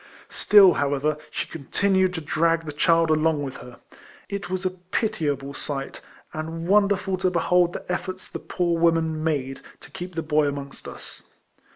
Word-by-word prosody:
Still, 200 -4 +6
however, 145 +1 0
she - - -3
continued 185 +4 0
to 165 - -3
drag 165 +2 +1
the 155 - -4
child 165 +2 +3
along 155 -1 +2
with 135 -2 -6
her. 125 -1 -12 0.5
It 200 -2 -5
was 185 +1 -3
a 185 - +1
pitiable 165 - -2
sight, 135 -1 -5 0.3
and 165 +2 -5
wonderful 200 -1 +2
to 185 0 +1
behold 175 0 +2
the - - -5
eiforts 185 +1 -4
the - - -7
poor 170 -2 -1
woman 165 -2 +2
made 135 -4 -2 0.2
to - - -15
keep 180 -1 -7
the 165 - -2
boy 155 -1 +2
amongst 140 -1 -6
us. - - -11
165 Hz, 165 wpm, -24 LUFS, 150-185 Hz, 0.5 s, Still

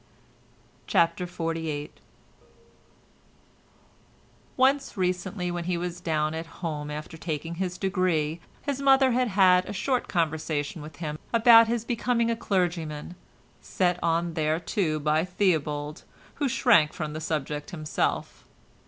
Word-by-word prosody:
CHAPTER 170 +2 +2
XLVIII 165 -4 -3 2.7
Once, 270 -1 +2
recently, 180 0 -1
when 175 -1 -4
he 180 -1 0
was 175 0 -4
down 155 -2 0
at 165 +1 -5 0.2
home 150 -3 -3
after 150 +2 -7
taking 160 0 -4
his 180 -1 -2
degree, 180 -5 0 0.2
his 280 -2 -2
mother 270 -1 +5
had 250 +1 +2
had 185 -3 +4
a - - -4
short 255 +5 -1
conversation 160 -2 -1
with 150 0 -10
him 155 -1 -5
about 230 -1 +7
his 230 0 -1
becoming 235 -1 +1
a - - 0
clergyman, 175 -7 -2 0.5
set 180 -1 0
on 170 0 +1
thereto 160 +1 0
by 155 +1 +1
Theobald, 155 -6 -1 0.4
who 280 - +2
shrank 185 -11 +4
from 155 -2 -4
the 155 - -5
subject 150 -2 -3
himself. 155 -4 -2
170 Hz, 125 wpm, -27 LUFS, 155-195 Hz, 2.7 s, about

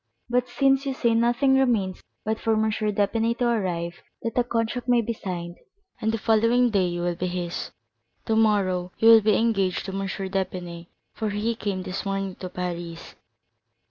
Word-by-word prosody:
But, 250 0 +2
since 270 +2 +2
you 270 - -1
say 235 -3 +2
nothing 240 +4 +3
remains 215 -8 +1 0.2
but 220 +1 -1
for 225 - +1
M. 220 0 +2
d'Épinay 215 +2 0
to 245 - +1
arrive 175 -7 -1 0.2
that 230 - -2
the 245 - +2
contract 235 +1 -2
may 245 -1 +5
be 230 0 -1
signed, 175 -4 -6 0.4
and 220 - +1
the 225 - -1
following 230 +3 +3
day 195 -3 +2
you 175 0 -3
will 175 0 0
be 180 +2 -3
his, 175 -1 -4 0.6
tomorrow 200 -5 +2
you 225 - +5
will 225 -1 +9
be 215 0 +3
engaged 200 -5 +1
to 195 - -4
M. 195 0 -3
d'Épinay, 185 -3 -4 0.3
for 220 -2 -2
he 210 +3 -1
came 200 -4 -3
this 185 +1 -4
morning 195 -1 -2
to 185 - -6
Paris." 175 -2 -5
210 Hz, 175 wpm, -25 LUFS, 185-230 Hz, 0.6 s, will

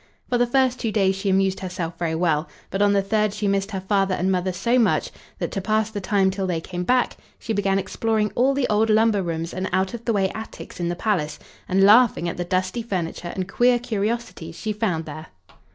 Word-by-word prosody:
For 245 - +1
the 245 - +3
first 255 0 +2
two 225 - -1
days 195 -3 +2
she 195 +1 -2
amused 190 0 +2
herself 180 -3 -5
very 165 -2 -1
well, 160 -2 +1 0.2
but 195 - -1
on 205 0 +5
the 200 -1 +2
third 210 0 0
she 210 - -1
missed 195 0 0
her 195 -3 -4
father 195 -1 +1
and 185 +2 0
mother 185 0 0
so 235 +8 +1
much 225 - +2 0.3
that, - - -3
to 195 - -3
pass 215 +2 0
the 205 -2 -4
time 190 0 +2
till 190 0 -3
they 175 -3 -1
came 175 +2 -5
back, 250 +6 +1 0.2
she 225 - -4
began 195 -2 +1
exploring 210 +2 0
all 265 +3 +2
the 275 -2 +1
old 215 +1 +2
lumber 215 -1 +3
rooms 165 -1 -3
and 185 0 -3
out 190 +3 0
of 235 -1 -7
the 230 - +1
way 195 -2 +1
attics 220 -4 -9
in 170 -1 -1
the 175 - -2
palace, 175 -7 -1 0.3
and 190 +1 +3
laughing 210 -3 +5
at 170 - -4
the 175 - -1
dusty 185 +5 -1
furniture 180 -5 -4
and 185 -1 -3
queer 245 +5 +3
curiosities 215 -7 -3
she 215 +4 -3
found 185 -7 -1
there. 155 +1 -8
195 Hz, 230 wpm, -23 LUFS, 180-220 Hz, 0.3 s, on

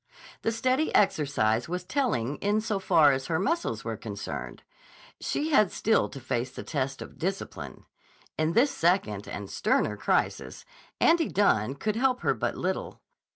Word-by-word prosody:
The 225 - 0
steady 255 +6 +1
exercise 135 - +2
was 180 +1 -3
telling 180 - -1
in 205 +1 +1
so 215 -2 -2
far 160 -6 +5
as 135 0 -2
her 160 - 0
muscles 330 - -1
were - - -4
concerned; - - -6 0.6
she 310 +2 -2
had 215 -9 +4
still 220 - +2
to 140 - -9
face 125 -1 -2
the - - -8
test 135 -3 -3
of - - -14
discipline. 190 +3 -5 0.5
In 155 +1 0
this 265 +7 +4
second 165 - +1
and 100 -1 -6
sterner 105 - +1
crisis, - - -1 0.3
Andy 330 -1 +4
Dunne 135 - +2
could 215 +9 -2
help 255 0 +1
her - - +2
but - - -2
little. - - -3
180 Hz, 155 wpm, -28 LUFS, -, 0.6 s, far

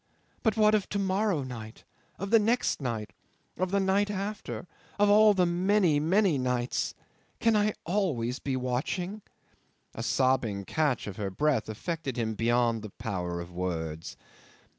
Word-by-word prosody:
But 220 -1 +1
what 215 0 +5
of 210 -3 +1
to 205 - -2
morrow 195 -4 +1
night? 115 -4 -8 0.3
Of 195 +1 -5
the 225 - +7
next 225 -5 +1
night? 115 -5 -3 0.4
Of 185 +1 -1
the 200 +1 +2
night 195 +1 +2
after 205 -1 -4 0.3
of 205 0 +4
all 210 0 +7
the 180 -1 +4
many, 175 -2 +3
many 175 0 +3
nights? 125 -1 -1 0.4
Can 230 -1 +3
I 210 0 +3
be 215 - 0
always 150 - -1
watching?" 135 +10 -2 0.7
A - - -6
sobbing 120 -4 +1
catch 150 -3 0
of 100 -2 -7
her 100 -2 -2
breath 135 +2 0
affected 140 - -4
him 110 -2 -1
beyond 115 0 +1
the 110 - -7
power 90 -4 -4
of 85 0 -7
words. 80 -3 -4
145 Hz, 155 wpm, -29 LUFS, -, 0.7 s, the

